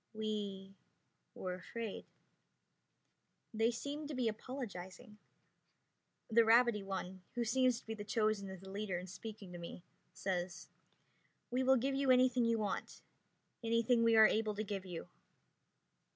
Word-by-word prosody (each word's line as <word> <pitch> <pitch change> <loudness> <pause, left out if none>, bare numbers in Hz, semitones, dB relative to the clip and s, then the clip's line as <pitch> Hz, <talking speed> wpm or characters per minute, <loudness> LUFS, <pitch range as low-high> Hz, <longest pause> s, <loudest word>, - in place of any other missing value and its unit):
"We 205 -3 -3 0.6
were 185 -1 -3
afraid." 220 +4 -5 1.5
They 225 +1 +3
seem 285 +5 -4
to 295 - -5
be 250 -2 +1
apologizing. 215 -4 -6 1.1
The 230 +1 +5
rabbity 230 -1 +5
one, 190 -1 -4
who 240 - +1
seems 250 0 +3
to - - -22
be 205 - -6
chosen 215 -1 0
as 190 -1 -8
the 190 0 -9
leader 200 -2 -2
in 180 - -5
speaking 200 +1 -8
to 175 - -7
me, 170 0 -8 0.3
says, 180 -2 -3 0.8
"We 250 +1 +1
will 265 0 +5
give 270 +3 0
you 275 0 +1
anything 255 -1 +5
you 230 0 +3
want. 210 -2 -3 0.6
Anything 230 +1 +3
we 230 0 +5
are 220 0 +9
able 215 -1 +2
to 215 - -2
give 195 -2 -4
you." 175 -2 -6
215 Hz, 140 wpm, -36 LUFS, 195-235 Hz, 1.5 s, are